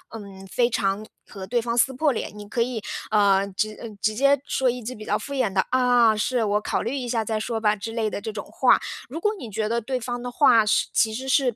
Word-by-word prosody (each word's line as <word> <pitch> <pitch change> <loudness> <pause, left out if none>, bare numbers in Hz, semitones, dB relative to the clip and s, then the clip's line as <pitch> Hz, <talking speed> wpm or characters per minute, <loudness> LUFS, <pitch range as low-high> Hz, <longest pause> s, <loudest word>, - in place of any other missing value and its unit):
嗯， 195 -3 -10
非 240 +5 +1
常 200 -1 -1 0.2
和 195 -2 -8
对 235 +5 0
方 235 0 -2
撕 255 +3 +4
破 280 +2 +1
脸， 225 - -4
你 205 - -9
可 235 +3 -1
以， 235 -2 -1 0.3
呃， 200 -2 +4
直 215 +2 -2
呃， 230 - -6
直 215 0 +1
接 275 +3 +4
说 260 -1 +1
一 245 0 -3
句 250 +3 -6
比 215 - -10
较 210 0 0
敷 280 - -7
衍 255 -7 0
的： 190 0 +1
“啊， 245 -3 +4
是， 240 +3 0
我 210 0 +1
考 - - -1
虑 235 +5 -3
一 255 -3 -4
下 230 -2 0
再 220 0 -1
说 225 +1 -2
吧。” 210 -1 +2
之 215 +2 -6
类 225 -1 -1
的 205 - -5
这 220 +1 -4
种 205 -1 -6
话。 260 - +3 0.3
如 305 +6 -5
果 420 +5 +1
你 235 -10 -8
觉 215 +1 -1
得 235 +1 0
对 255 +3 -3
方 245 +1 -4
的 245 - -4
话 230 -5 +5
是 210 - +2
其 220 -1 +2
实 260 +4 -5
是 255 -3 +2
225 Hz, 280 characters per minute, -24 LUFS, 210-250 Hz, 0.3 s, 话